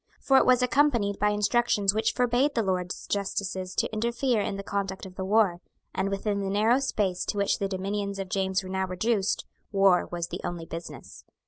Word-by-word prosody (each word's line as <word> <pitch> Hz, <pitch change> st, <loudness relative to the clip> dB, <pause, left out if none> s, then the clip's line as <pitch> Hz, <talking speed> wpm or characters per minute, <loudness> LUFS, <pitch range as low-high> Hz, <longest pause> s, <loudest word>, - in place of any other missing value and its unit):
For 270 Hz, -, +4 dB
it -, -, +4 dB
was 250 Hz, 0 st, +5 dB
accompanied 245 Hz, -6 st, +2 dB
by 210 Hz, -, +3 dB
instructions 210 Hz, -1 st, +2 dB
which 220 Hz, +1 st, +1 dB
forbade 250 Hz, +4 st, +1 dB
the 230 Hz, -, +2 dB
Lords 180 Hz, -2 st, -2 dB
justices 190 Hz, -2 st, -3 dB
to -, -, -1 dB
interfere 235 Hz, +1 st, 0 dB
in 200 Hz, -, -3 dB
the 200 Hz, -, -5 dB
conduct 195 Hz, -1 st, -3 dB
of 190 Hz, -, -10 dB
the 190 Hz, -, -5 dB
war; 190 Hz, -3 st, +2 dB, 0.3 s
and, 190 Hz, +1 st, -1 dB
within 200 Hz, +1 st, -1 dB
the 195 Hz, -1 st, -2 dB
narrow 220 Hz, +6 st, +3 dB
space 200 Hz, -9 st, -1 dB
to -, -, -3 dB
which 200 Hz, -1 st, +1 dB
the 200 Hz, -, 0 dB
dominions 200 Hz, +1 st, -3 dB
of 195 Hz, -1 st, -4 dB
James 190 Hz, 0 st, 0 dB
were 185 Hz, -, -8 dB
now 190 Hz, 0 st, -1 dB
reduced, 195 Hz, +2 st, 0 dB, 0.3 s
war 195 Hz, -3 st, +4 dB
was 170 Hz, -1 st, -3 dB
the -, -, -5 dB
only 170 Hz, -2 st, -4 dB
business. 165 Hz, +1 st, -9 dB
200 Hz, 200 wpm, -27 LUFS, 190-220 Hz, 0.3 s, was